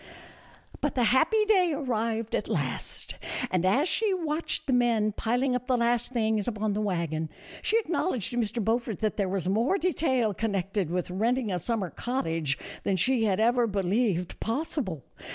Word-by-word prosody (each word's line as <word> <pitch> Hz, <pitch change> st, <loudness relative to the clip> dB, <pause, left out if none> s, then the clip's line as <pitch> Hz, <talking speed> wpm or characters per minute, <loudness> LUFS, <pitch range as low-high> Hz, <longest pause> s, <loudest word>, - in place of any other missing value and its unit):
But 295 Hz, -, -1 dB
the 250 Hz, -, +2 dB
happy 320 Hz, -, +4 dB
day 370 Hz, -6 st, +4 dB
arrived 230 Hz, -5 st, -1 dB
at -, -, 0 dB
last, -, -, -3 dB, 0.4 s
and, 180 Hz, -2 st, +1 dB
as 255 Hz, -, +3 dB
she 415 Hz, 0 st, +1 dB
watched 325 Hz, -2 st, -2 dB
the 270 Hz, -, 0 dB
men 230 Hz, -3 st, +3 dB
piling 245 Hz, +5 st, 0 dB
up 250 Hz, 0 st, -3 dB
the 255 Hz, -, +2 dB
last 240 Hz, +1 st, +1 dB
things 220 Hz, -4 st, 0 dB
upon 215 Hz, -2 st, -1 dB
the 210 Hz, -, -1 dB
wagon, 165 Hz, -5 st, -1 dB, 0.3 s
she 445 Hz, -, +2 dB
acknowledged 345 Hz, -, 0 dB
to 245 Hz, -, -3 dB
Mr. 230 Hz, -1 st, -1 dB
Beaufort 225 Hz, -2 st, 0 dB
that 215 Hz, -1 st, 0 dB
there 200 Hz, -3 st, 0 dB
was 185 Hz, -2 st, -2 dB
more 230 Hz, -, +2 dB
detail 265 Hz, -, +1 dB
connected 195 Hz, -3 st, -1 dB
with 180 Hz, 0 st, -2 dB
renting 230 Hz, +4 st, 0 dB
a 180 Hz, -, -1 dB
summer 205 Hz, -2 st, -2 dB
cottage 165 Hz, -, -1 dB, 0.2 s
than 195 Hz, -, 0 dB
she 225 Hz, +5 st, +2 dB
had 195 Hz, -2 st, +1 dB
ever 240 Hz, +1 st, +3 dB
believed 195 Hz, -2 st, 0 dB
possible. 225 Hz, -, -2 dB
225 Hz, 170 wpm, -28 LUFS, 195-255 Hz, 0.4 s, happy